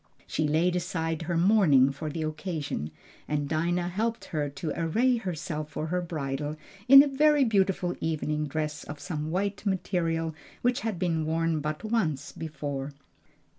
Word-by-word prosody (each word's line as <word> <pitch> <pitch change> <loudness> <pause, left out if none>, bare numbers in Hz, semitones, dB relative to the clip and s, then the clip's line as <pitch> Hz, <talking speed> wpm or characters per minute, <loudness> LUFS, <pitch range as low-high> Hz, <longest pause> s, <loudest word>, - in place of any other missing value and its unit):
She 155 - -1
laid 165 +4 +2
aside 165 -2 -2
her 165 +1 -1
mourning 165 -8 +5
for 150 +3 -5
the 160 +1 -3
occasion, 155 - -3 0.4
and 145 -1 -1
Dinah 175 +3 0
helped 225 +5 -2
her 150 -2 0
to 145 +3 -4
array 230 +10 +2
herself 160 -6 -4
for 155 - -4
her 180 +3 -1
bridal 150 -3 -3 0.3
in 275 +2 +11
a - - 0
very 295 +1 +4
beautiful 195 -5 +1
evening 155 -1 -1
dress 150 +1 -3
of 145 0 -8
some 155 -3 -4
white 195 +4 -1
material 175 -4 -1 0.3
which 245 +2 +2
had 220 -8 -2
been 165 -3 0
worn 165 0 +1
but 150 +4 -3
once 170 - -1
before. 145 -3 -5
165 Hz, 155 wpm, -28 LUFS, 150-190 Hz, 0.4 s, in